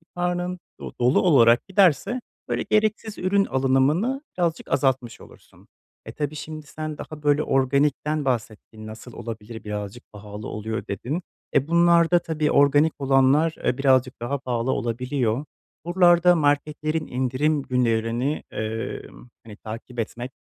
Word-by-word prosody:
karnın 180 0 -2 0.2
do - - -7
dolu 125 +3 +4
olarak 120 -8 +5
giderse 195 - +2 0.3
böyle - - -1
gereksiz 215 0 0
ürün 195 +2 +2
alınımını 135 - +1 0.2
birazcık 170 -2 -1
azaltmış 130 -4 0
olursun. - - -18 0.4
E, - - -7
tabii 150 0 -4
şimdi 155 0 -8
sen 155 0 -6
daha 155 -1 -9
böyle 145 +1 +3
organikten 140 +3 +1
bahsettin 110 -3 -4
"Nasıl 110 +3 -10
olabilir? 110 0 -8
Birazcık 105 +2 -6
pahalı 105 0 -8
oluyor.", 110 +1 -5
dedin. 125 - -3 0.3
Eee, 140 0 +2
bunlarda 170 0 +4
tabii 155 -2 -1
organik 145 +2 +4
olanlar, 135 +4 +3
eee, 125 - +1
birazcık 130 -3 +2
daha 135 +4 -2
pahalı 125 -1 -2
olabiliyor. 125 +1 -1 0.4
Buralarda 175 0 +5
marketlerin 150 +1 0
indirim 130 +4 0
günlerini, 120 +2 0
eee, 110 +1 -4 0.4
hani, 105 -2 -11
takip 115 +3 -8
etmek, 120 +3 -4
140 Hz, 130 wpm, -24 LUFS, 120-160 Hz, 0.4 s, olarak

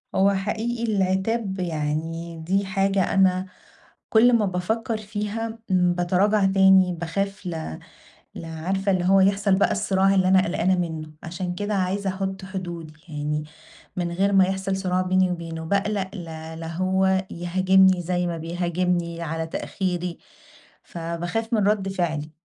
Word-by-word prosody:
هو 195 +1 +4
حقيقي 220 +4 -2
العتاب 190 +1 0
يعني 165 0 -3
دي 195 +2 +1
حاجة 195 -1 +1
أنا 190 -1 +3 0.6
كل 235 +2 +5
ما 220 -3 +4
بافكر 220 +5 -1
فيها 215 +2 -4
باتراجع 185 +3 +2
تاني، 190 -1 +5
باخاف 195 +4 -3
ل 160 - -5 0.6
ل - - -7
عارفة 190 +5 -1
اللي 180 -1 0
هو 195 +1 +5
يحصل 195 +1 +3
بقى 195 - +3
الصِّراع 195 -1 +2
اللي 185 -1 +3
أنا 190 0 +5
قلقانة 185 +2 +1
منه. 160 -3 -4
عشان 175 +1 -4
كده 205 +2 -2
عايزة 195 +1 0
أحط 190 0 -4
حدود 175 -5 -6
يعني، 150 0 -3 0.5
من 175 -1 -2
غير 195 +3 +1
ما 195 -1 +6
يحصل 190 0 -1
صراع 185 -1 0
بيني 185 0 +2
وبينه، 165 -2 -5
باقلق 200 +1 0
لا 160 -3 -7
لا 165 - -6
هو 190 +2 +1
يهاجمني 185 +1 +3
زي 180 +1 -1
ما 170 -1 -3
بيهاجمني 170 0 -1
على 160 0 -3
تأخيري، 180 0 -3 0.6
فباخاف 175 +7 -4
من 210 -3 +2
رد 200 -2 +1
فعلي. 160 -5 -2
185 Hz, 140 wpm, -24 LUFS, 170-195 Hz, 0.6 s, ما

